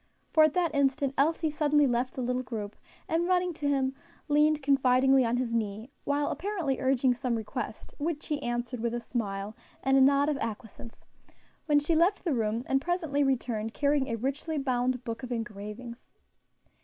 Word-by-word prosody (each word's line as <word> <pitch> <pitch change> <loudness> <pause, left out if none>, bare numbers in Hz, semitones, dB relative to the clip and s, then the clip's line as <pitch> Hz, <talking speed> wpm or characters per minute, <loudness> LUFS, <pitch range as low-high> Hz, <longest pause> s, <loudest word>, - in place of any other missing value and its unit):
for 315 - +7
at 310 -1 +3
that 350 -2 +1
instant 275 -1 +1
Elsie 315 +2 +1
suddenly 295 -1 +3
left 250 0 0
the 255 - -3
little 250 +1 0
group, 215 -5 -6 0.3
and 330 +2 0
running 360 -1 +2
to 300 -2 -3
him, 265 -2 +1 0.4
leaned 300 0 +3
confidingly 265 -1 +4
on 235 +1 +1
his 245 -2 -2
knee, 220 +2 -2
while 285 0 0
apparently 350 -9 -2
urging 260 -1 +2
some 245 0 -2
request, 220 0 -5
which 305 0 -2
he 295 -2 -2
answered 240 0 -3
with 235 +1 -1
a - - -1
smile 210 -3 -4 0.3
and 270 0 +3
a - - +6
nod 280 +2 +5
of 300 -2 0
acquiescence; 225 -1 -7 0.6
when 295 -2 +4
she 300 +3 0
left 355 +6 +3
the 335 - 0
room, 225 -1 -1
and 270 0 +1
presently 320 -4 0
returned 235 -5 -1
carrying 285 -2 +2
a 230 - -1
richly 275 +7 -3
bound 255 -2 0
book 230 -2 -5
of 255 -1 -7
engravings. 230 +1 -7
265 Hz, 180 wpm, -29 LUFS, 235-295 Hz, 0.6 s, for